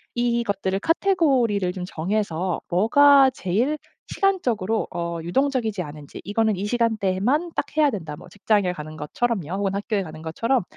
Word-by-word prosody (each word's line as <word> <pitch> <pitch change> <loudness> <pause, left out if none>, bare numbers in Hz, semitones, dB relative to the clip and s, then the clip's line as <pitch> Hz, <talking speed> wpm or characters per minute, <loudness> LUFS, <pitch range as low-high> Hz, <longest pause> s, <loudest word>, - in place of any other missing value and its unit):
이것들을 235 -5 0
카테고리를 265 - +2
좀 185 -1 -5
정해서 180 0 -2
뭐가 270 +8 +6
제일 245 +7 -1 0.3
시간적으로 240 - 0
어 170 -1 -3
유동적이지 225 - 0
않은지 150 -3 -9
'이거는 215 +1 +1
이 190 +2 -3
시간대에만 230 - 0
딱 - - -1
해야 305 -2 +4
된다.' 165 - -5
뭐 - - -14
직장에 205 -2 +1
가는 155 -2 -8
것처럼요. 175 +3 -2
혹은 195 0 -1
학교에 205 0 -1
가는 155 -2 -10
것처럼 230 +10 0
205 Hz, 360 characters per minute, -23 LUFS, 180-245 Hz, 0.3 s, 뭐가